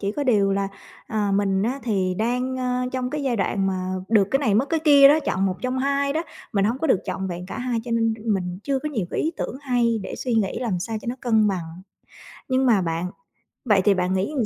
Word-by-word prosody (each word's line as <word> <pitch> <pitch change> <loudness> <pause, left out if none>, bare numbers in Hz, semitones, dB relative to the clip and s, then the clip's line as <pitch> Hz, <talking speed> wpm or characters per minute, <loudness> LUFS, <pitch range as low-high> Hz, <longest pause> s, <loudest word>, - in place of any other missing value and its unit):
chỉ 200 0 -2
có 290 +2 -2
điều 205 -6 +3
là, 195 0 0 0.4
à, 210 -2 -1
mình 195 -1 +1
á 250 +5 -1
thì 190 -5 0
đang, 250 +3 -1
a, 250 0 -1
trong 255 -1 -2
cái 300 -1 -3
giai 250 -4 0
đoạn 195 -1 0
mà 185 -1 -2 0.2
được 210 -3 +4
cái 270 - +3
này 225 -8 +1
mất 240 +7 +3
cái 325 - +1
kia 285 -3 +7
đó, 300 - +5
chọn 195 -9 0
một 185 - 0
trong 255 +1 -1
hai 280 +1 +1
đó, 320 +2 -1 0.3
mình 200 -3 +2
hông 230 +5 0
có 320 - -1
được 200 - +3
trọn 190 - -3
vẹn 180 0 -6
cả - - -6
hai 245 -2 -1
cho 240 - -7
nên 225 -1 +1 0.2
mình 180 -1 -3
chưa 275 -1 0
có 300 - -4
nhiều 225 -11 -2
cái - - -1
ý 320 - 0
tưởng - - -4
hay 240 -4 +1
để - - -6
suy 245 -3 -2
nghĩ 210 -4 0
làm 220 -8 -1
sao 220 +5 -3
cho - - -12
nó 245 - -1
cân 220 -3 +3
bằng. 175 -2 -5 0.7
Nhưng 260 0 +2
mà 225 -6 +4
bạn, 165 0 -2 0.6
vậy 205 -5 +4
thì 205 - +6
bạn 185 0 0
nghĩ 190 +7 0
làm 245 - +1
225 Hz, 255 wpm, -23 LUFS, 195-260 Hz, 0.7 s, kia